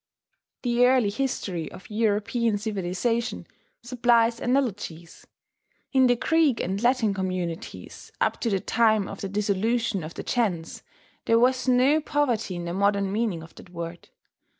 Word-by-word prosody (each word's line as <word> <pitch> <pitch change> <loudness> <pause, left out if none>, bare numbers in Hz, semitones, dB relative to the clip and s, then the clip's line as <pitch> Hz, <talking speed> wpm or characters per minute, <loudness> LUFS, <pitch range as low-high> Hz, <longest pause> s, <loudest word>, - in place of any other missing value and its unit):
The 245 -1 +2
early 250 -5 +3
history 200 - -3
of - - -12
European 220 +1 0
civilization 215 +3 -2 0.4
supplies 235 -1 +2
analogies. 205 -10 -2 0.7
In 260 -1 +5
the 245 - +4
Greek 310 -1 +2
and 195 +2 -2
Latin 240 -4 +2
communities, 185 -3 -5
up - - 0
to 235 - 0
the 195 -3 +1
time 220 -2 +2
of 195 - -8
the 195 - -4
dissolution 210 +1 0
of 155 +2 -8
the - - -6
gens, 185 -9 -1 0.4
there 230 - +4
was 255 +2 +2
no 260 +5 +4
poverty 250 -11 0
in 175 0 -5
the 170 - -3
modern 200 0 +1
meaning 205 -6 -1
of 165 - -14
that - - -14
word. 170 -1 -7
220 Hz, 145 wpm, -25 LUFS, 190-245 Hz, 0.7 s, In